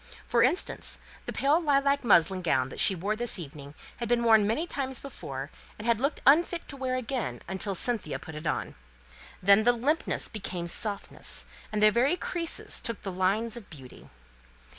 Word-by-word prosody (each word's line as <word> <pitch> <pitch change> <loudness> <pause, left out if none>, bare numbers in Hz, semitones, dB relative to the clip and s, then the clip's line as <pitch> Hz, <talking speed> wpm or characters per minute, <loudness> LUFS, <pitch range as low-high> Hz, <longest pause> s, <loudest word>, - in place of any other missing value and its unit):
For 235 - +2
instance, 275 +10 0 0.3
the - - -2
pale 295 +5 +2
lilac 280 -2 +2
muslin 185 -4 +4
gown 135 -6 0
she 195 - +3
wore 200 +5 -2
this 240 -1 +3
evening 145 -3 -9 0.2
had 235 -2 -4
been 240 -1 +2
worn 220 -3 +5
many 265 +10 0
times 265 -6 -4
before, 140 - -7 0.3
and 210 - -8
had 235 -2 +2
looked 280 +4 -1
unfit 335 +4 +4
to 280 - -5
wear 260 -1 -2
again 235 - -3 0.2
till 200 -1 -1
Cynthia 185 - +1
put 160 +3 -10
it 150 +1 -6
on. - - -2 0.7
Then 200 +3 +6
the 245 +2 +5
limpness 280 +8 0
became 185 -5 -5
softness, 200 +4 -1 0.3
and 210 0 0
the 215 - +7
very 265 +10 +2
creases 335 -3 -1
took 230 -4 -4
the 195 - -4
lines 200 +5 0
of 235 -5 -10
beauty. 130 -5 -13
225 Hz, 175 wpm, -28 LUFS, 185-265 Hz, 0.7 s, the